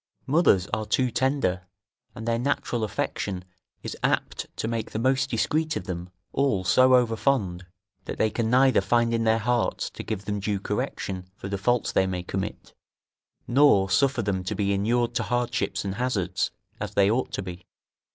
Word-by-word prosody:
Mothers 135 - +4
are 110 -1 -1
too 125 +3 +1
tender, 120 -8 0 0.5
and 110 - -7
their 115 0 +1
natural 125 -3 -1
affection 95 -2 -3 0.4
is - - -5
apt - - 0
to - - -2
make 115 -1 -2
the - - -2
most 130 +3 +1
discreet 155 +6 0
of - - -3
them 90 -1 -5 0.2
all 130 -9 +1
so 130 +7 +5
overfond, 115 -7 +1 0.4
that - - -5
they 110 - +2
can 115 0 -1
neither 130 +2 +5
find 120 -1 +2
in 115 0 +1
their 110 0 +4
hearts 120 +2 0
to - - -7
give 105 -2 -4
them 105 0 -2
due 100 0 -1
correction 95 -1 -3
for 95 - -7
the 100 - -1
faults 120 +3 +1
they 95 - +2
may 90 -1 -3
commit, 95 +1 -5 0.7
nor 120 -8 +4
suffer 130 +4 +2
them 95 -2 -1
to 90 - -3
be 100 -1 +1
inured 120 +4 +1
to 120 - 0
hardships 120 -3 -1
and 95 - -2
hazards, 115 -5 -1 0.3
as - - -5
they 100 0 +4
ought 125 +3 0
to - - -3
be. 90 -1 -8
110 Hz, 180 wpm, -26 LUFS, 95-125 Hz, 0.7 s, so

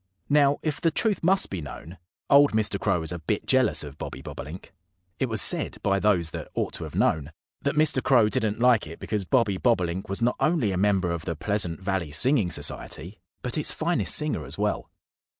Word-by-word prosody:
Now, 145 -1 +4
if 155 -2 -3
the 165 - +3
truth 205 +6 0
must 190 +3 +3
be 95 -4 -4
known, 80 +4 -10 0.3
old 140 -1 +5
Mr. 105 -2 0
Crow 95 -5 0
was 80 - -3
a 90 - -5
bit 80 - -2
jealous - - +3
of 75 0 -10
Bobby - - -7
Bobolink. 75 +8 -9 0.5
It 130 - 0
was 110 -2 +3
said - - +1
by 100 0 +1
those 90 -6 +2
that - - -6
ought - - -2
to - - -4
have - - -9
known 75 -1 +1 0.3
that 140 0 -1
Mr. 150 -3 +3
Crow 120 -6 +4
didn't 105 +1 -1
like 120 -6 +3
it 80 - -9
because 105 -3 -3
Bobby 110 -5 +1
Bobolink 95 -6 0
was 95 - -3
not 120 +1 0
only 155 - +1
a - - -2
member 95 -2 +1
of 85 -1 -4
the 85 - -3
Pleasant 95 0 -1
Valley 95 -4 -2
Singing 120 - +3
Society, 85 +5 -3 0.2
but 125 +4 -2
its - - 0
finest 170 +2 +1
singer 150 - 0
as 65 - -6
well. - - -2
105 Hz, 205 wpm, -25 LUFS, 85-130 Hz, 0.5 s, old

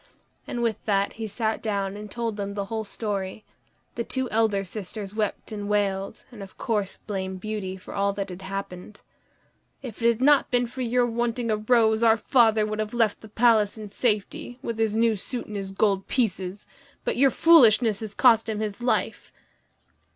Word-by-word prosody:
And 240 -1 -3
with 225 -3 -1
that 200 -1 +1
he 225 -1 -5
sat 220 +1 -2
down 200 -3 -2
and 210 0 -8
told 230 +1 -3
them 200 -1 -4
the 200 -1 -2
whole 220 0 -1
story. 205 -1 -4 0.5
The 235 - -3
two 260 +2 -2
elder 215 -3 +2
sisters 200 +1 -6
wept 215 +1 -3
and 205 -1 -5
wailed, 200 -2 -1
and 225 -4 -11
of 195 -1 -11
course 210 -4 -2
blamed 190 -2 -4
Beauty 200 -2 -4
for 190 - -11
all 200 0 +1
that 200 -1 -4
had 180 +1 -8
happened. 195 0 -7 0.8
"If 240 -3 -8
it 230 - +3
had 235 -1 +2
not 285 +2 +4
been 245 -1 +2
for 250 +2 -7
your 245 0 +2
wanting 235 0 -1
a 215 - +1
rose, 220 0 +3
our 225 -1 +5
father 225 -2 +3
would 215 0 -4
have 215 +2 -3
left 225 -3 +1
the 220 - -12
palace 220 -2 +3
in 215 -1 -8
safety, 215 +2 -1
with 230 -3 -4
his 220 -1 +1
new 225 0 +3
suit 240 +5 -5
and 210 - -8
his 195 -1 -4
gold 195 0 0
pieces; 195 -5 -1 0.4
but - - 0
your 270 +2 +5
foolishness 235 -9 +5
has 215 -2 -7
cost 225 -3 +4
him 215 -1 -2
his 215 +1 -4
life." 245 - -1
215 Hz, 190 wpm, -25 LUFS, 200-230 Hz, 0.8 s, our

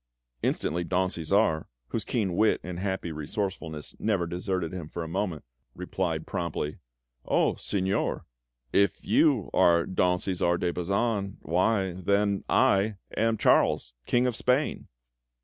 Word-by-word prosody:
Instantly 85 +2 0
Don 90 +2 +1
Cæsar, 85 -1 +1 0.2
whose - - -2
keen 100 -6 -1
wit 110 +3 +3
and 90 0 -5
happy 95 -3 -2
resourcefulness 80 0 -4
never 100 -5 +1
deserted 90 0 -2
him 85 -5 -6
for 85 - -4
a - - -6
moment, 90 -3 -3 0.3
replied 90 -3 -2
promptly: 75 -3 -3 0.4
"Oh - - +2
Signor, 95 -1 -1 0.5
if 100 -2 +2
you - - +3
are 85 -1 +4
Don 90 -1 +2
Cæsar 90 -2 0
de 85 -1 0
Bazan, 100 +2 -1
why, 95 +4 +1
then, 100 +3 +1
I 100 +2 +3 0.2
am 115 0 +2
Charles, - - +3
King 120 +1 +3
of 125 -2 0
Spain!" 125 +5 0
95 Hz, 130 wpm, -28 LUFS, 85-100 Hz, 0.5 s, are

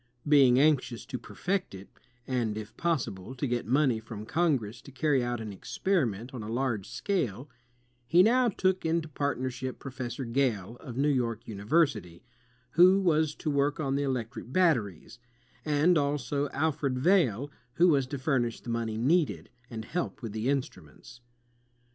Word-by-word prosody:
Being 135 -4 +6
anxious 140 -5 +2
to 125 - -5
perfect 185 - -3
it, 95 +1 -11 0.4
and 120 -5 -1
if 110 0 -8
possible 130 - -2
to 130 - -2
get 120 -4 -2
money 130 -2 +2
from 110 -1 -8
Congress 135 -8 0
to 140 - -13
carry 140 -1 +1
out 120 -1 -2
an 110 -2 -6
experiment 125 - -1
on 125 - -6
a 105 - -6
large 120 -4 -2
scale, 135 - -2 0.6
he 175 +6 +6
now 245 +3 +4
took 185 -2 0
into 165 0 0
partnership 130 -3 -3
Professor 130 -1 -6
Gale, 115 -4 -1
of 125 -5 -9
New 140 - +2
York 120 -6 -1
University, 105 - 0 0.5
who 185 +5 +6
was 155 -5 +2
to 155 - -3
work 145 +1 +1
on 135 -3 -1
the 140 - 0
electric 125 -3 -3
batteries; 125 - 0 0.4
and 150 +4 +3
also 145 0 -1
Alfred 140 -2 -1
Vail, 145 - +2 0.2
who 180 +2 +5
was 140 -5 +2
to 140 - -4
furnish 130 -4 0
the 120 - -6
money 115 -2 -2
needed, 150 +7 +1 0.2
and 110 -2 -6
help 175 -4 -4
with 115 - -4
the 110 +3 -3
instnmients. 125 - -4
135 Hz, 155 wpm, -29 LUFS, 115-155 Hz, 0.6 s, Being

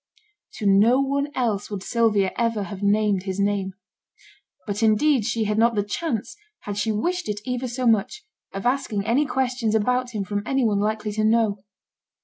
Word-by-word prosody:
To 215 - -6
no 210 +6 +5
one 280 +1 0
else 220 -5 -1
would 200 -2 -5
Sylvia 215 -5 +2
ever 230 -3 0
have 195 0 -7
named 205 -1 +2
his 190 0 -4
name. 200 -1 0 0.9
But 205 0 -3
indeed 225 +3 +3
she 230 -1 0
had 210 0 0
not 230 0 +3
the 205 - +1
chance, 225 +1 -3 0.3
had 205 - -5
she 220 +1 0
wished 345 +10 -2
it 210 0 -2
ever 250 0 -2
so 250 +1 -3
much, 230 - +1 0.3
of 195 +3 -6
asking 245 -6 0
any 260 +6 +2
questions 250 -4 0
about 250 +2 0
him 205 - -1
from 205 +1 -3
any 270 +2 0
one 205 -3 +1
likely 215 0 -1
to 215 +1 -1
know. 220 -2 +2
220 Hz, 180 wpm, -23 LUFS, 205-250 Hz, 0.9 s, no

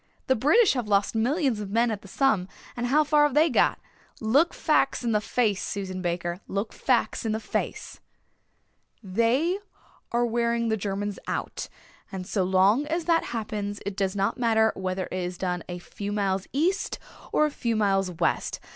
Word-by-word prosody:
The 260 - +3
British 330 - +4
have 245 -5 -2
lost 200 -1 +2
millions 250 +1 +1
of 205 -2 -5
men 230 +3 +2
at 210 -2 -4
the - - -13
Somme 215 -4 +1 0.3
and 245 0 -2
how 300 +5 +4
far 300 0 +3
have 290 - -1
they 310 +1 +5
got? - - +3 0.4
Look 275 +10 +3
facts 275 -4 +1
in 235 - 0
the 210 -1 +2
face, 215 -3 0
Susan 190 -2 -4
Baker, 175 0 -2
look 200 +3 -3
facts 250 -3 0
in 220 -2 -1
the 220 - -1
face." - - -4 1.0
"They 235 - +1 0.5
are 240 0 +2
wearing 235 0 0
the 220 - +2
Germans 205 0 -3
out - - -4 0.4
and 190 -2 -5
so 190 0 0
long 190 +9 +3
as 330 +1 -1
that 330 -1 +2
happens 210 -3 -4
it 200 -1 -3
does 195 0 -1
not 195 +3 0
matter 220 -2 +3
whether 185 0 -2
it 185 - -2
is 180 0 -4
done 180 -1 -2
a 175 - -4
few 200 +3 -6
miles 195 -2 -1
east 345 +8 0 0.3
or 305 - +4
a 300 - -1
few 235 -5 -1
miles 195 -3 +2
west. 175 - -1
220 Hz, 180 wpm, -26 LUFS, 195-255 Hz, 1.0 s, they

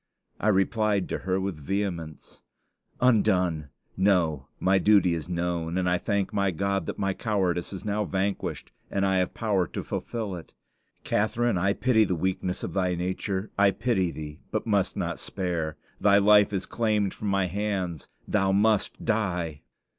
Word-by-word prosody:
I - - -1
replied 105 0 +2
to - - -2
her 95 0 -1
with 95 -4 -3
vehemence: 85 -2 -4 0.6
"Undone! 90 - +2 0.3
No; 90 -8 +2
my 95 +1 +3
duty 100 -5 +4
is 80 0 -4
known, 85 -1 -2
and 90 -1 +1
I 90 0 +2
thank 100 0 -1
my 100 -1 +2
God 100 +3 -1
that - - -4
my 95 -1 0
cowardice 95 -5 -1
is 95 +1 -7
now 105 0 0
vanquished 95 +1 -2 0.2
and 100 0 0
I 95 -1 +2
have 90 -1 0
power 100 -6 +1
to - - -5
fulfill 110 -5 -4
it. 85 -2 -11 0.5
Catharine, 110 0 +1
I 100 +3 +2
pity 115 -1 +3
the 95 -3 0
weakness 90 +1 -2
of - - -4
thy 90 -2 +1
nature; 95 +3 -3
I 100 0 +6
pity 95 -4 0
thee, 75 -1 -8
but 110 - -2
must 100 -4 +1
not - - -2
spare. 85 -5 -3 0.2
Thy 100 -1 +5
life 105 0 +6
is 95 -2 -2
claimed 105 -4 0
from 105 - -5
my 100 -1 +2
hands; 95 -4 -2 0.2
thou 95 0 +2
must 105 +1 +1
die!" 90 -9 -1
95 Hz, 165 wpm, -27 LUFS, 90-105 Hz, 0.6 s, I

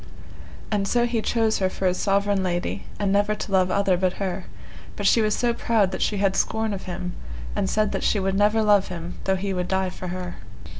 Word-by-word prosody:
And 200 -2 +1
so 240 +3 +2
he 235 -2 0
chose 225 -1 +1
her 190 -1 +2
for 190 - -4
his 180 0 +1
sovereign 200 0 +2
lady, 175 -1 -2
and 200 -2 0
never 205 +1 +2
to 210 - -6
love 185 -1 +3
other 195 -1 +2
but 185 0 +1
her, 190 -2 -3 0.5
but 205 - -4
she 225 - +5
was 215 -1 +2
so 240 -1 +1
proud 220 -5 +1
that - - -4
she 210 - +1
had 195 -1 +1
scorn 220 +1 0
of 195 - -6
him, 180 0 -4 0.4
and 195 -2 0
said 215 -1 +1
that - - -2
she 210 - +2
would 195 0 0
never 210 +3 +3
love 205 -2 +4
him 175 -1 -7
though 190 - +2
he 195 +1 -2
would 180 -1 -2
die 190 -1 0
for 180 - -7
her. 180 0 -5
195 Hz, 230 wpm, -24 LUFS, 185-210 Hz, 0.5 s, she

